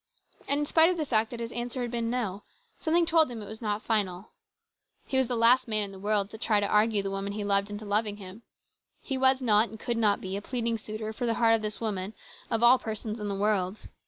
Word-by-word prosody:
And 285 +1 +1
in - - 0
spite 320 +3 +4
of 365 - -1
the 310 - -1
fact 220 -4 +1
that 240 - -7
his 230 0 -5
answer 240 +1 -3
had 240 - -4
been 235 -1 -2
No, 215 -5 -2 0.4
something 335 +1 +2
told 320 -2 +4
him 240 -2 -6
it 210 - -7
was 220 +3 -7
not 210 -1 -2
final. 200 -4 -1 0.7
He 265 - +1
was 260 - +2
the 245 - -2
last 245 +3 +5
man 215 -2 +1
in 200 - -5
the 190 - -11
world 205 0 0
to 220 - -10
try 215 -2 +2
to 205 - 0
argue 210 0 +2
the 195 - -3
woman 195 +1 -3
he 210 0 -4
loved 200 0 +1
into 205 +1 -6
loving 205 0 0
him. 195 +2 -11 0.6
He 270 - -4
was 260 0 +3
not 220 -2 +3
and 220 - -11
could 240 0 -2
not 210 -3 +2
be 190 0 -5
a 200 - -3
pleading 230 -1 -2
suitor 215 +1 -6
for 240 +2 -3
the 230 - +1
heart 230 -1 +4
of 225 - +2
this 215 0 -4
woman 205 -2 -3 0.3
of 225 +1 0
all 250 +2 +7
persons 220 0 -5
in 210 - -4
the 200 - -2
world. 200 -1 0
220 Hz, 255 wpm, -28 LUFS, 205-240 Hz, 0.7 s, all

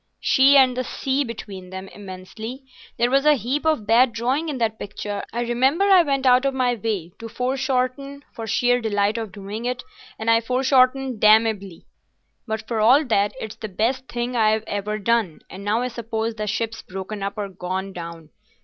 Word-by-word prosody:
"She 275 +2 +5
and 260 -2 +5
the 255 - -1
sea 270 +2 -1
between 200 -6 -8
them—immensely. 195 +6 -8 0.3
There 240 +1 +2
was 275 +1 +3
a 300 0 +5
heap 270 +6 -2
of 310 -10 +1
bad 235 +3 +4
drawing 260 +8 -1
in 285 - -3
that 220 -2 -1
picture. 205 0 -5
I 235 - -2
remember 260 +8 +2
I 385 -3 +7
went 275 -4 -1
out 250 0 +5
of 275 -1 0
my 250 -2 +2
way 205 -6 -3
to 230 - -7
foreshorten 265 +2 -2
for 225 -1 -6
sheer 245 +3 +2
delight 210 0 0
of 220 -3 -5
doing 205 +4 -7
it, 250 0 -2 0.3
and 220 - -6
I 230 0 +5
foreshortened 255 0 +2
damnably, 215 -4 +3 0.6
but 220 0 -4
for 230 -2 -2
all 255 +8 +5
that 205 -4 +1
it's 220 -1 -7
the 215 - -6
best 245 +7 -1
thing 240 +1 -3
I've 220 -1 +2
ever 205 +1 -3
done; 215 -5 0
and 190 +2 -9
now 215 +4 0
I - - -1
suppose 230 -1 -3
the 215 -1 -4
ship's 225 +2 -2
broken 190 +2 -7
up 200 +1 -4
or 205 -1 -2
gone 190 +1 -4
down. 170 -3 -9
230 Hz, 185 wpm, -22 LUFS, 205-255 Hz, 0.6 s, I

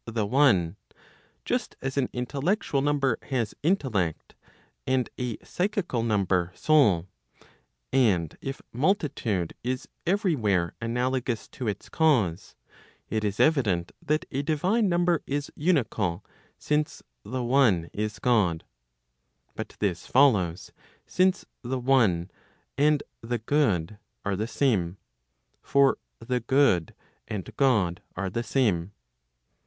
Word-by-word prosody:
the 110 -2 -1
one, 100 - +3 0.7
just - - -2
as 135 0 -4
an 135 -3 +1
intellectual 140 - -1
number 140 -4 +1
has 120 -6 -2
intellect, 125 - 0 0.5
and 130 -1 +1
a 125 -3 -2
psychical 180 - -1
number 95 -5 +1
soul, 115 - +4 0.9
and 100 - +2
if 135 0 -6
multitude 125 - 0
is 125 +1 -3 0.2
every 190 -2 +2
where 95 - +1
analogous 125 +1 -1
to 125 - -6
its 105 -2 -3
cause, 105 - +1 0.6
it 110 -1 0
is 105 -1 -2
evident 105 - +2
that 155 +1 0
a 135 - -1
divine 185 +9 +1
number 175 -1 +2
is 145 +1 -2
unical, 110 - 0 0.3
since 150 0 -1 0.2
the 130 0 -3
one 120 -10 +3
is 105 0 -3
God. 100 -7 +2 0.9
But - - -6
this 90 -5 -2
follows, 100 -10 +3 0.3
since 185 0 +1 0.2
the 130 +1 -2
one 115 -9 +2 0.4
and 150 +1 +3 0.2
the 120 +1 -2
good 105 - 0 0.3
are 100 -1 0
the 110 +4 -2
same. 100 -9 0 0.6
For 140 -1 +3 0.2
the 125 +2 -2
good 120 - +2 0.3
and 105 -5 -5
God 105 -11 +2
are 95 0 -3
the 115 - -1
same. 105 -8 0
120 Hz, 115 wpm, -27 LUFS, 100-140 Hz, 0.9 s, soul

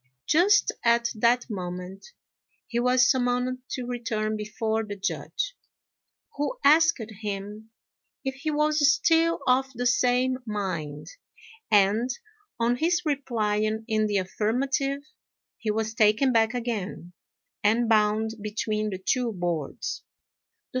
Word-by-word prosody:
Just 395 +6 +4
at 235 0 +3
that 235 +2 +2
moment 180 -2 -6 0.6
he 235 - -2
was 250 0 +4
summoned 250 0 +1
to 255 - -4
return 230 -3 -2
before 220 +1 -2
the 205 -1 -6
Judge, 410 - -3 0.8
who 295 +13 -2
asked 320 +2 +5 0.2
him 210 +1 -5 0.6
if 265 - -1
he 275 +4 -4
was 300 0 +3
still 330 0 +2
of 265 +1 +2
the 245 +1 -3
same 250 +1 +2
mind; 185 -9 -4 0.6
and, 210 +4 +3 0.5
on 235 +1 +2
his 345 +5 +1
replying 220 -6 -1
in 215 -2 +1
the 205 -1 0
affirmative, 265 +8 -1 0.6
he 220 - -3
was 220 +1 -1
taken 225 +3 +3
back 225 +1 +3
again, 215 -7 -4 0.5
and 225 +3 +3
bound 215 0 +2
between 215 0 -2
the 190 - -4
two 240 +5 0
boards. 175 - -3
230 Hz, 120 wpm, -26 LUFS, 210-260 Hz, 0.8 s, asked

